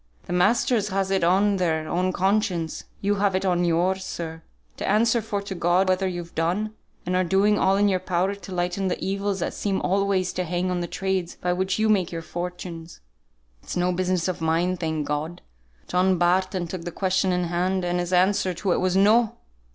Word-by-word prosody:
The - - -4
masters 210 +3 +2
has 195 -1 -1
it 190 -2 +1
on 195 +3 +3
their 160 -3 0
own 180 +3 0
conscience, 190 -3 0 0.2
you 205 +1 +1
have 195 -1 +1
it 190 - 0
on 175 -1 +2
yours, 180 +3 +1
sir, 165 -3 -6 0.4
to - - -4
answer 225 +3 +3
for 205 -2 -3
to 200 - -5
God 175 +2 +2
whether 185 +1 +1
you've 175 -2 -5
done, 185 +7 -1 0.3
and 180 +1 -1
are 185 - +3
doing 195 +4 +3
all 190 +1 +3
in 205 +1 +3
your 190 -2 +2
power 185 +2 0
to 200 -1 -10
lighten 180 +2 -1
the 180 - -2
evils 195 0 -2
that - - -2
seem 195 -2 -1
always 195 -1 +1
to 185 - -1
hang 180 +1 -1
on 180 - -1
the 175 - -3
trades 190 -1 -2
by 180 0 -1
which 190 +1 -1
you 220 0 +2
make 195 -5 +2
your 165 -1 -5
fortunes. 175 -1 -6 0.6
It's - - -6
no 180 +1 +2
business 185 -1 0
of 185 -2 -3
mine, 165 +3 +1
thank 160 -3 -2
God. 150 +4 -3 0.4
John 185 +1 +2
Barton 180 +1 +1
took 175 +1 -6
the 175 - -5
question 190 +1 +1
in 180 0 +1
hand, 180 +2 0
and 175 0 0
his 175 0 -3
answer 185 0 +2
to 185 +2 -1
it - - +2
was 185 0 +1
NO! 215 +3 +4
185 Hz, 205 wpm, -24 LUFS, 175-195 Hz, 0.6 s, NO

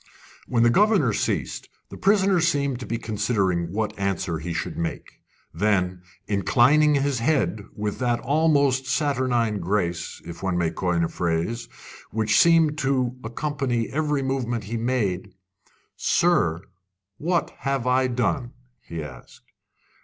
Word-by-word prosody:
When 115 -2 +2
the 120 - +5
governor 195 - +3
ceased, - - -2 0.2
the - - -7
prisoner 195 -2 +3
seemed 140 -6 +1
to 125 - -7
be 115 - -2
considering 100 -6 -1
what 110 +2 -2
answer 95 -4 -1
he 85 +2 -5
should 85 - -3
make. 85 -1 -5 0.3
Then, 95 -4 0 0.3
inclining 135 +9 +4
his 140 -2 0
head 120 -5 +1
with 105 -1 -3
that 120 -2 +1
almost 140 -3 +2
saturnine 125 -6 +1
grace, 90 -2 -2
if 85 0 -9
one 95 -2 -1
may 85 -2 +1
coin 90 -2 0
a - - +1
phrase, 85 +9 -2 0.4
which 110 0 +2
seemed 160 -2 +4
to 130 -2 0
accompany 125 -1 -2
every 150 -1 0
movement 125 -4 -2
he 110 +3 -5
made: 105 -6 -1 0.6
"Sir, 135 - +2 0.6
what 170 +2 0
have 135 -3 -1
I 130 +1 +3
done?" 125 +1 -1 0.3
he 85 -6 -6
asked. 65 -4 -13
120 Hz, 135 wpm, -24 LUFS, 95-140 Hz, 0.6 s, the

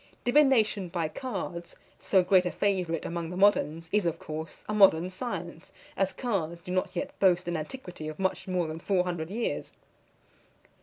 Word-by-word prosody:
Divination 245 -8 +3
by 165 -2 -1
cards, 180 - -5 0.2
so 190 -2 +3
great 185 0 +4
a - - -2
favourite 180 -5 0
among 170 -1 -3
the 180 - -6
moderns, 165 -5 +3
is, 205 -4 +2
of 165 - -1
course, 155 +1 -7
a 210 - -2
modern 185 -4 +5
science; 180 -5 -6 0.2
as 195 -1 +1
cards 175 -9 -2
do 180 - -5
not 185 +1 -1
yet - - -2
boast 180 -2 +3
an 175 - -1
antiquity 175 -1 -6
of 155 - -6
much 190 0 -1
more 180 -2 0
than 160 +1 -5
four 185 +1 +1
hundred 175 -3 -3
years. 225 +4 -3
180 Hz, 170 wpm, -28 LUFS, 170-200 Hz, 0.2 s, modern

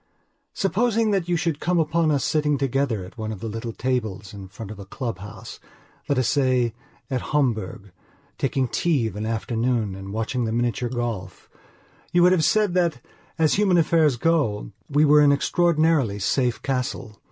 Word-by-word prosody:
Supposing 220 +2 +1
that 190 -4 0
you 175 - +2
should 165 -3 -1
come 180 0 0
upon 165 0 +2
us 145 -3 +1
sitting 150 -2 +1
together 135 -7 -1
at 95 - -14
one 110 0 -3
of 105 - -6
the 115 - -5
little 115 +2 -5
tables 110 -6 -3
in 100 -2 -9
front 100 +2 -9
of 110 - -9
the 100 - -9
club 115 +4 -5
house, 105 +2 -10 0.5
let 140 - +2
us 130 - +2
say, 130 -5 +2 0.4
at 130 -2 0
Homburg, 110 -9 -1 0.5
taking 135 0 0
tea 145 0 +1
of 110 - -4
an 105 +1 -3
afternoon 115 -1 -1
and 95 +1 -8
watching 115 +3 -2
the 110 - -2
miniature 120 +1 -1
golf, 115 -7 -5 0.6
you 175 0 +4
would 180 - +6
have 180 -4 +3
said 210 +1 +2
that, 170 -7 +1 0.4
as 160 -2 +3
human 195 -3 +3
affairs 160 -4 +3
go, 120 - 0 0.2
we 145 +1 +4
were 150 0 +6
an 145 -1 +6
extraordinarily 155 - +2
safe 120 +4 0
castle. 125 -4 -3
130 Hz, 175 wpm, -23 LUFS, 110-155 Hz, 0.6 s, would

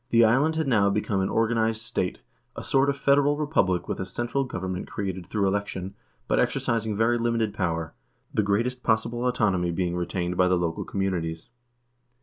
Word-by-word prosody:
The 115 0 +6
island 140 +8 +3
had 160 -2 0
now 105 -6 +4
become 100 0 0
an 95 - 0
organized 115 0 +1
state 110 - -3 0.2
— - - -44
a - - -6
sort 135 +1 +3
of 140 - -1
federal 140 +1 +3
republic 125 - +1
with - - -3
a 95 - -2
central 120 +8 -1
government 95 -5 -4
created 95 -3 -4
through 100 -2 0
election, 95 -1 -2 0.3
but - - +2
exercising 110 -2 0
very 115 +2 +2
limited 115 -3 0
power, 85 -5 -2 0.4
the - - +2
greatest 115 +5 0
possible 115 +2 0
autonomy 100 -8 +1
being 85 0 -1
retained 90 0 -2
by 90 - +4
the 90 0 +3
local 85 -1 -2
communities. 85 -4 -2
105 Hz, 175 wpm, -26 LUFS, 90-120 Hz, 0.4 s, The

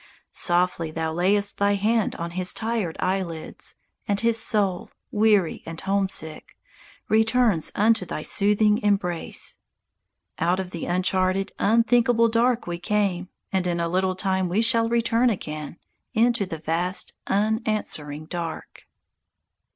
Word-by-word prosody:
Softly 175 -2 0
thou 160 0 -3
layest 200 +4 +2
thy 200 0 +3
hand 215 +2 +1
on 170 0 -5
his 185 +1 0
tired 220 -7 -2
eyelids, 185 -4 -3 0.3
And 200 -1 0
his 230 -1 +1
soul, 200 -7 0 0.2
weary 210 -5 +2
and 165 0 -8
homesick, 190 -5 -3 0.5
returns 220 -5 +2
Unto 220 0 +3
thy 155 -3 -5
soothing 210 +1 +3
embrace. 195 -6 -1 0.8
_Out 175 +3 +2
of 190 -1 -4
the 170 - -5
uncharted, 185 +2 +1
unthinkable 230 +1 +3
dark 235 +1 +2
we 175 0 -4
came, 185 -1 -1 0.2
And 185 -1 +1
in 170 -1 -1
a 170 - 0
little 185 +2 0
time 190 -1 0
we 205 +6 +2
shall 230 -1 +2
return 235 +1 +2
again 155 -6 -5 0.4
Into 230 -3 +2
the 165 - -5
vast, 165 +4 -2
unanswering 205 -8 -1
dark. 170 -1 -6
195 Hz, 130 wpm, -24 LUFS, 175-220 Hz, 0.8 s, thy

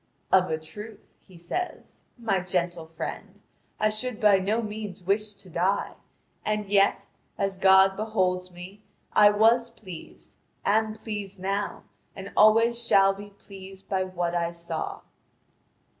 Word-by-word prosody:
"Of 185 -2 +5
a 160 - 0
truth," 210 +7 -10 0.2
he 185 - -15
says, 355 - -5
"my 220 -5 0
gentle 175 -2 -2
friend, 165 0 -7 0.4
I 215 - +3
should 220 +2 -3
by 210 -4 +5
no 205 +4 0
means 210 -4 -6
wish 210 +3 0
to 195 - -16
die; 180 +3 0 0.5
and 210 0 -1
yet, 200 0 +2 0.3
as 195 -1 -1
God 190 0 +6
beholds 185 -4 0
me, 180 +3 -11 0.3
I 210 0 +7
was 225 +3 +4
pleased, 185 -8 -12 0.3
am 215 +1 +2
pleased 210 -3 -6
now, 195 +2 -2 0.3
and 195 0 -8
always 230 +2 +5
shall 195 -3 +5
be 205 +1 -10
pleased 195 -1 -13
by 190 -1 +1
what 175 -2 -2
I 170 -1 0
saw." 170 -1 -5
195 Hz, 140 wpm, -26 LUFS, 185-215 Hz, 0.5 s, I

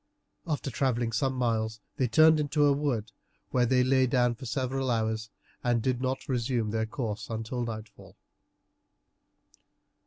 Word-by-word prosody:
After 145 -3 -2
travelling 120 -1 0
some 130 +4 0
miles 110 -3 0 0.2
they 130 - +2
turned 155 +6 +6
into 150 0 +2
a 145 - +5
wood, 140 -7 -1 0.4
where 125 -1 +3
they 125 +1 +4
lay 130 0 +3
down 125 -1 +2
for 125 +2 -9
several 130 +2 -1
hours, 110 -2 -1 0.3
and 120 -1 +2
did 125 +1 -1
not 130 0 -2
resume 120 -3 0
their 110 0 -1
course 110 -5 -4
until 115 +2 -3
nightfall. 110 -2 -8
125 Hz, 145 wpm, -29 LUFS, 115-130 Hz, 0.4 s, turned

